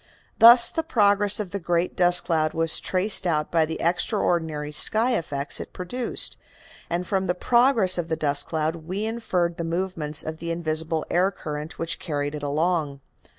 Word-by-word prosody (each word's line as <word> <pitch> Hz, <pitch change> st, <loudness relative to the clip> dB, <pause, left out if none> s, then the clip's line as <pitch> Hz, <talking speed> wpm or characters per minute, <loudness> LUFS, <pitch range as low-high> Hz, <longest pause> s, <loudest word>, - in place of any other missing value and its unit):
Thus 235 Hz, +1 st, +8 dB
the 325 Hz, -, -1 dB
progress 205 Hz, -, +1 dB
of 200 Hz, -4 st, -5 dB
the 200 Hz, -, -4 dB
great 170 Hz, 0 st, -1 dB
dust 175 Hz, -1 st, +3 dB
cloud 155 Hz, -2 st, 0 dB
was 165 Hz, 0 st, +1 dB
traced 190 Hz, 0 st, +2 dB
out 150 Hz, -3 st, -1 dB
by 160 Hz, -2 st, +2 dB
the 160 Hz, -, -5 dB
extraordinary 160 Hz, -3 st, -1 dB
sky 220 Hz, +10 st, +4 dB
effects 145 Hz, -3 st, -4 dB
it -, -, -9 dB
produced, 235 Hz, +7 st, -3 dB, 0.5 s
and 175 Hz, +1 st, -2 dB
from 190 Hz, -1 st, -1 dB
the 180 Hz, -, 0 dB
progress 235 Hz, -4 st, +3 dB
of 170 Hz, -, -3 dB
the 160 Hz, -, -1 dB
dust 145 Hz, -2 st, 0 dB
cloud 160 Hz, +1 st, -2 dB
we 185 Hz, +6 st, -5 dB
inferred 185 Hz, -7 st, -2 dB
the 170 Hz, -, -3 dB
movements 165 Hz, -3 st, -2 dB
of 155 Hz, 0 st, -6 dB
the 170 Hz, -, -6 dB
invisible 160 Hz, -1 st, -2 dB
air 180 Hz, +2 st, +2 dB
current 150 Hz, -4 st, -7 dB
which 165 Hz, 0 st, -2 dB
carried 145 Hz, -2 st, -3 dB
it 150 Hz, -, -6 dB
along. 150 Hz, 0 st, -1 dB
170 Hz, 175 wpm, -24 LUFS, 155-190 Hz, 0.5 s, Thus